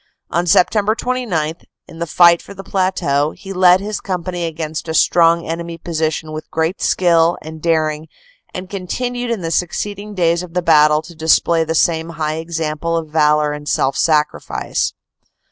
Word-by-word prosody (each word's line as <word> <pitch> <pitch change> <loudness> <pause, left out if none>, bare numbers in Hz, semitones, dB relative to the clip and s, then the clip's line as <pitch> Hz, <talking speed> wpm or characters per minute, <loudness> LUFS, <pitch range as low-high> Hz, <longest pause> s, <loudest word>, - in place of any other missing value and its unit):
On 170 +1 0
Sept. 210 +5 +3
29, 210 -12 -1 0.3
in 165 - -12
the 170 - -3
fight 170 +1 +5
for 200 - -12
the 195 - -9
plateau, 185 -7 0
he 195 -1 -8
led 180 0 +5
his 205 +2 -4
company 180 -2 -3
against 160 0 -5
a 160 - -3
strong 170 0 +4
enemy 165 +1 -5
position 160 -2 -3
with 155 0 -7
great 160 +4 -2
skill 170 -2 +3
and 160 0 -9
daring 155 -1 0 0.4
and 185 0 -7
continued 245 +6 -4
in 230 -5 -2
the 165 -1 -3
succeeding 205 +5 -3
days 170 -2 +2
of 180 -1 -10
the 180 - 0
battle 155 -2 +4
to 175 - -12
display 165 +1 +2
the 160 0 -3
same 160 0 +1
high 155 0 -2
example 165 0 -2
of 160 -2 -4
valor 150 -1 +3
and 150 0 -6
self 135 0 +1
sacrifice. 150 -2 0
165 Hz, 165 wpm, -18 LUFS, 155-180 Hz, 0.4 s, fight